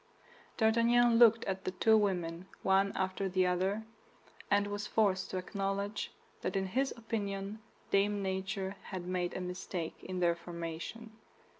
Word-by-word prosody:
D'Artagnan 230 +1 +4
looked 230 -1 +7
at 190 0 -2
the - - -1
two 220 +4 +4
women, 180 -4 0 0.2
one 195 +1 +4
after 190 +1 -1
the 185 0 +2
other, 190 +4 0 0.6
and 205 0 +4
was 205 0 -3
forced 195 -4 +2
to 185 - -3
acknowledge 200 +2 -2 0.3
that 185 - -2
in 195 0 +1
his 265 +8 0
opinion 205 -2 -3 0.3
Dame 200 0 +2
Nature 190 +1 -2
had 185 -2 -5
made 180 -1 -1
a - - -3
mistake 180 -2 -5
in 185 -1 -4
their 175 -1 +4
formation. 170 +6 -6
195 Hz, 145 wpm, -33 LUFS, 185-210 Hz, 0.6 s, looked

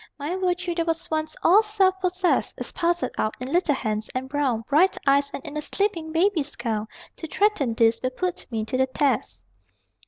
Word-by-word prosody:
My 300 +5 -3
virtue, 365 -1 -1
that 335 -1 -2
was 330 -1 -2
once 310 0 -1
all 385 +6 +7
self 390 -3 +1
possessed, 365 0 +1
Is - - -4
parceled 345 0 0
out 215 - 0
in 255 +2 -5
little 335 -5 +3
hands, 215 -4 -2
and 260 +1 -2
brown 265 -5 0
Bright 355 +7 +3
eyes, 280 0 +3
and - - -7
in 295 - -7
a 300 - -2
sleeping 335 -2 -1
baby's 325 -4 +1
gown: 220 -3 -2 0.3
To 320 - -6
threaten 305 - +1
these 225 0 +3
will 255 - 0
put 360 +7 -4
me 220 -2 -2
to 255 +3 -2
the 260 0 +2
test. 260 - -1
305 Hz, 195 wpm, -24 LUFS, 260-360 Hz, 0.3 s, all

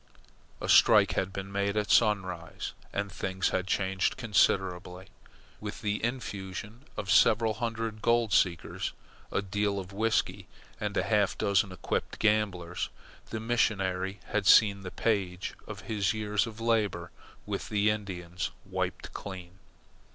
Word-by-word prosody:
A - - -4
strike - - +6
had 95 - -1
been 95 0 -6
made 100 +1 0
at 105 0 0
Sunrise, 95 -6 +1 0.2
and 100 0 -2
things 95 0 -1
had 95 0 -1
changed 95 -1 0
considerably. 95 -5 +1 0.5
With 105 0 -6
the 105 0 -1
infusion 110 -1 -4
of 95 - -2
several 110 0 +5
hundred 115 -2 -3
gold 115 -2 +2
seekers, 85 -4 +1 0.4
a - - 0
deal 100 +1 0
of 95 0 -6
whisky, 110 +2 0 0.3
and - - -3
half - - +2
a - - -24
dozen 100 -1 +2
equipped 90 - -3
gamblers, 100 -5 0 0.4
the 110 - -3
missionary 95 -5 0
had 105 -1 0
seen 100 -3 +6
the 95 - -6
page 95 -4 -1
of 100 -2 -7
his 100 +1 0
years 105 0 0
of 110 0 -9
labour 105 -7 0 0.3
with - - -4
the 105 0 +3
Indians 90 -4 -4 0.2
wiped - - -3
clean. 95 -2 -8
100 Hz, 135 wpm, -29 LUFS, 95-110 Hz, 0.5 s, strike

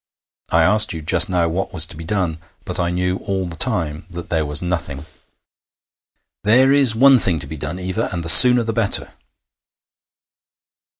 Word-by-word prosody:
I 80 0 +1
asked 105 +3 +3
you 80 -2 -9
just 85 +3 +3
now 90 -2 -1
what 90 +4 -5
was 80 - +3
to 80 - -10
be 80 - -11
done, 85 -3 -4 0.3
but - - -6
I 85 - -2
knew 90 +1 -3
all 95 -2 -5
the 85 -2 -9
time 80 - -3
that 85 0 -10
there 80 -3 -2
was 75 +1 -1
nothing.' 85 -5 -6 1.4
'There 130 +6 +2
is 135 -6 +3
one 135 +2 +4
thing 90 -6 0
to 75 - -2
be 75 +3 -10
done, 75 +4 -7
Eva, 95 0 -5
and 85 -3 -6
the - - -7
sooner 125 +6 +8
the 115 0 -5
better.' 110 -3 0
90 Hz, 180 wpm, -17 LUFS, 80-105 Hz, 1.4 s, sooner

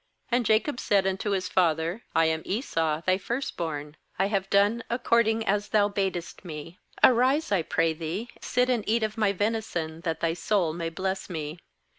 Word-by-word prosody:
19And 245 -1 +3
Jacob 235 +5 +2
said 200 -5 +2
unto 190 +2 -1
his 190 -2 0
father: 170 +2 +1
'I 165 - +5
am 160 0 +1
Esau 165 - -1
thy 185 +1 +2
first 235 +7 -3
born; 150 -3 -4 0.2
I 195 +1 +1
have 195 -2 -1
done 205 +4 +3
according 235 -2 +2
as 205 +1 0
thou 205 -1 +3
badest 190 -4 -3
me. 165 0 -8 0.2
Arise, 260 +5 +4
I 195 -4 +3
pray 165 0 +1
thee, 170 +9 -4
sit 250 0 +1
and 245 -4 +1
eat 225 +1 +2
of 215 -1 -1
my 215 -3 +2
venison, 200 -6 -2
that 165 -2 -2
thy 165 -1 +1
soul 175 -1 0
may 165 0 -3
bless 190 +3 -3
me.' 155 -1 -5
195 Hz, 180 wpm, -27 LUFS, 165-220 Hz, 0.2 s, I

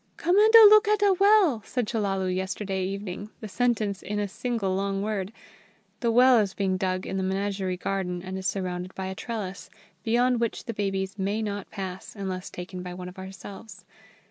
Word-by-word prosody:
"Come 350 +2 +1
anda 440 +2 +8
look 425 +1 +7
ata 410 -2 +4
well!" 395 - +5
said 245 +3 -2
Chellalu 195 -4 -1
yesterday 190 0 -2
evening, 195 +1 -5
the 215 - -7
sentence 215 -3 0
in 210 +1 -4
a 205 0 0
single 215 -1 -2
long 195 0 -1
word. 205 -2 -2 0.7
The 235 -2 +1
well 250 +1 +6
is 200 -3 -1
being 190 -2 0
dug 185 0 -1
in 190 - -3
the 190 - -1
Menagerie 190 -1 -2
garden 180 -2 -3
and 190 0 -6
is 190 0 -2
surrounded 180 -1 -3
by 190 - -4
a 190 - -4
trellis, 200 -4 -6 0.3
beyond 245 +1 +2
which 235 -1 -2
the 230 - -4
babies 195 -1 -2
may 205 +3 -1
not 205 -2 -4
pass, 190 -1 -7
unless 190 -3 -5
taken 180 +1 -7
by 180 0 -7
one 180 0 -7
of 180 - -13
ourselves. 195 +3 -10
195 Hz, 185 wpm, -26 LUFS, 190-225 Hz, 0.7 s, anda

